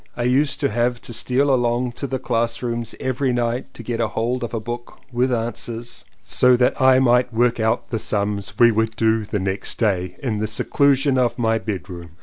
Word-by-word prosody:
I 120 - -1
used 135 +5 +2
to 140 - +2
have 120 +2 0
to 120 - -8
steal 135 +4 +1
along 120 0 +1
to 140 +4 -5
the 130 - -2
class 115 -1 -1
rooms 115 -2 -3
every 130 +1 -1
night 120 0 -1
to 115 - -8
get 115 0 -3
hold 120 +2 -1
of 115 - -4
a 115 - -2
book 120 +2 -7
"with 125 +2 +1
answers" 120 0 -4 0.2
so 125 0 +4
that 125 +3 +1
I 130 0 +6
might 125 -1 +3
work 120 +1 +1
out 110 0 0
the 115 - -2
sums 100 -2 -2
we 120 -1 +6
would 110 +1 0
do 110 -1 +1
the 105 - -2
next 95 +1 -3
day, 90 -5 0
in 110 -5 -1
the 110 - -1
seclusion 135 +4 +2
of 120 -2 +1
my 115 -2 +1
bedroom. 90 -5 -7
120 Hz, 200 wpm, -21 LUFS, 110-125 Hz, 0.2 s, I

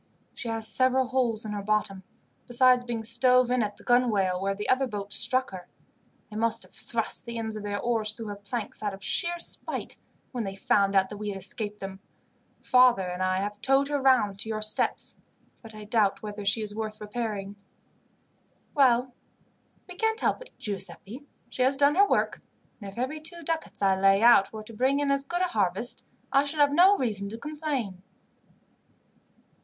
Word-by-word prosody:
She - - -6
has 225 -1 -3
several 255 +3 +2
holes 245 -4 -1
in 215 - -4
her 205 -1 -3
bottom, 200 -2 -1 0.5
besides 250 0 +4
being 235 -2 -4
stove 250 +2 +3
in 250 -1 +2
at 205 -1 -3
the - - -16
gunwale 210 -7 +2
where 195 0 -1
the 210 - -4
other 260 +1 +2
boat 205 -3 -5
struck 255 +1 +1
her. 180 -2 -9 0.6
They 215 - -6
must 230 0 0
have - - -20
thrust 230 -2 -2
the 235 -1 -6
ends 220 -1 -3
of 215 - -5
their 205 0 -3
oars 225 -3 0
through 225 +1 -8
her 205 - -5
planks, 205 +2 -4
out 205 -2 -2
of 195 - -15
sheer 340 +5 0
spite, 340 - -5 0.3
when 245 -3 -3
they 195 -1 -5
found 195 0 +2
that 190 +1 +2
we 210 0 -5
had 195 - -4
escaped 205 +2 -4
them. 195 0 -7 0.6
Father 250 -6 +5
and 180 +1 -5
I 185 0 +1
have 205 +1 -5
towed 270 +1 +3
her 290 -1 -1
round 240 -7 +3
to 220 - 0
your 215 -1 -2
steps, 215 0 +2 0.5
but 225 -2 -12
I 215 - -9
doubt 210 -2 +1
whether 210 -1 -6
she 205 +2 +2
is 205 -1 -4
worth 215 0 -5
repairing." 210 -2 -4 1.2
"Well, 255 -2 +3 0.7
we 360 - -9
can't 445 +3 +1
help - - 0
it, - - -11
Giuseppi. 210 +6 -5 0.2
She - - -3
has 265 +2 +3
done 285 +1 +4
her 400 +5 +5
work; - - 0 0.4
and 200 -1 -7
if 195 - -18
every 260 +6 -3
two 335 +2 -3
ducats 320 -9 -4
I 190 -1 +3
lay 195 +2 +4
out 230 -5 +6
were 215 -1 -8
to 225 - -11
bring 260 +5 +1
in 285 -1 +1
as 275 0 +2
good 350 +6 -3
a 365 - 0
harvest, 205 - -1 0.3
I 275 - +5
should 290 +2 -4
have 285 -1 +4
no 375 +6 +6
reason 205 -5 -1
to 225 - -7
complain." 280 - -4
225 Hz, 195 wpm, -27 LUFS, 205-260 Hz, 1.2 s, out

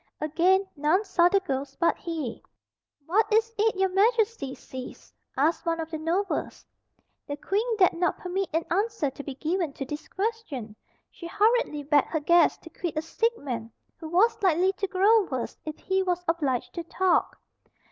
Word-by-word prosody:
Again 355 +6 +2
none 310 +7 +2
saw 350 -3 +4
the 395 - +3
ghost 280 -6 -4
but 340 - +3
he. 315 -8 -5 0.6
"What 425 +7 +2
is 450 +1 +2
it 440 0 +3
your 380 0 +2
Majesty 415 - +1
sees?" 260 -1 -10 0.2
asked 310 +5 +2
one 330 -1 -1
of 325 0 -5
the 315 - -4
nobles. 355 +5 -2 0.6
The 285 - -4
Queen 435 +8 -1
dared 370 -3 +5
not 345 0 0
permit 375 +1 -3
an 325 +1 0
answer 395 -6 0
to 285 - -9
be 275 -2 -6
given 330 +1 -1
to 270 - -5
this 295 +3 -7
question. 380 - -4 0.4
She 340 - -9
hurriedly 420 -6 +1
begged 290 0 +3
her 315 - -1
guests 340 +4 +4
to - - -10
quit 340 -4 -5
a - - +2
sick 455 +8 0
man 230 -5 -5 0.3
who 320 - -8
was 395 +8 +3
likely 370 0 +3
to 395 0 -3
grow 400 +3 +4
worse 260 -7 -4
if 310 -1 -5
he 380 0 0
was 360 -1 -1
obliged 290 -7 -1
to 340 - -4
talk. 365 +1 +1
345 Hz, 175 wpm, -27 LUFS, 300-395 Hz, 0.6 s, dared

